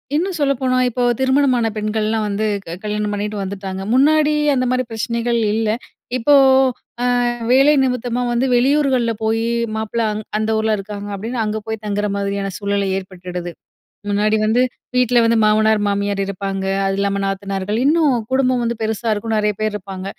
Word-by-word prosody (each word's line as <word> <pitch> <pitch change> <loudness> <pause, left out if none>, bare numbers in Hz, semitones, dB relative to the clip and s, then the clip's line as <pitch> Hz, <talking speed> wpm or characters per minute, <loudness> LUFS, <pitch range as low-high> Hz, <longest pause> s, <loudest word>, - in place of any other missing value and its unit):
இன்னும் 360 +3 0
சொல்லப்போனா, 265 -2 +1
இப்போ 245 +1 -2 0.2
திருமணமான 260 -3 +2
பெண்கள்லாம் 215 +1 -1
வந்து 205 +1 -1 0.2
க 165 - -6
கல்யாணம் 210 0 -2
பண்ணீட்டு 210 +1 -3
வந்துட்டாங்க. 190 0 -5
முன்னாடி 300 +3 +4 0.2
அந்தமாரி 255 0 +1
பிரச்சனைகள் 235 +1 -1
இல்ல. 220 -1 0 0.5
இப்போ, 255 +5 +3 0.7
"அ - - +1 0.5
வேலை 275 +3 +6
நிமித்தமா 250 -1 -1
வந்து 240 +2 +1
வெளியூர்கள்ல் 260 -2 +2
போயி, 225 +1 0 0.3
மாப்பிள 220 +1 -2
அங் 210 +1 -4 0.2
அந்த 220 0 -1
ஊர்ல 220 0 +1
இருக்காங்க." 205 +1 -7
அப்படீன்னு 230 +4 -4
அங்க 215 +1 -2
போய் 220 -1 -4
தங்குற 205 0 -1
மாதிரியான 200 0 -2
சூழல் 200 -1 -1
ஏற்பட்டுடுது. 180 -2 -7 0.6
முன்னாடி 210 +2 +2
வந்து 225 +3 +2 0.4
வீட்ல 245 -1 +4
வந்து 230 0 +3
மாமனார், 215 0 +3
மாமியார் 200 0 -1
இருப்பாங்க. 195 0 -4 0.2
அது 195 - 0
இல்லாம 200 0 0
நாத்தனார்கள், 195 +2 -2
இன்னும் 300 -3 +3 0.2
குடும்பம் 255 -2 +2
வந்து 235 0 -1
பெருசா 220 +1 -2
இருக்கும். 220 +1 -2
நெறைய 210 -1 +1
பேர் 215 -1 0
இருப்பாங்க. 190 -1 -7
220 Hz, 150 wpm, -19 LUFS, 200-245 Hz, 0.7 s, வேலை